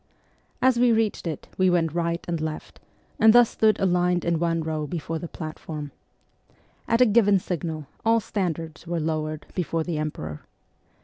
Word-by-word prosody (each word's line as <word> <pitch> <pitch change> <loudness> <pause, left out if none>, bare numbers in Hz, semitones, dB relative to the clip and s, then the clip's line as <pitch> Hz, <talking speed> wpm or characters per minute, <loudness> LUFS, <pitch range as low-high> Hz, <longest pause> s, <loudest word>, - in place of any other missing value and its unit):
As 255 -2 +4
we 245 -1 +5
reached 220 -5 0
it 155 -4 -5
we 185 0 +5
went 165 -3 +1
right 170 0 -1
and 170 -2 -2
left, 155 -1 -5 0.4
and 220 0 +7
thus 240 -1 +6
stood 215 -1 +2
aligned 180 -1 +2
in 170 -2 +1
one 165 -1 0
row 155 -1 -3
before 165 +1 -4
the 170 - -6
platform. 155 -2 -7 1.0
At 230 +2 +2
a - - +8
given 205 -3 +4
signal 165 -4 -4 0.2
all 230 0 +4
standards 170 -6 -4
were 170 0 -1
lowered 155 -1 -2
before 165 -2 -1
the 160 -2 -3
Emperor. 80 - -5
170 Hz, 165 wpm, -25 LUFS, 155-195 Hz, 1.0 s, a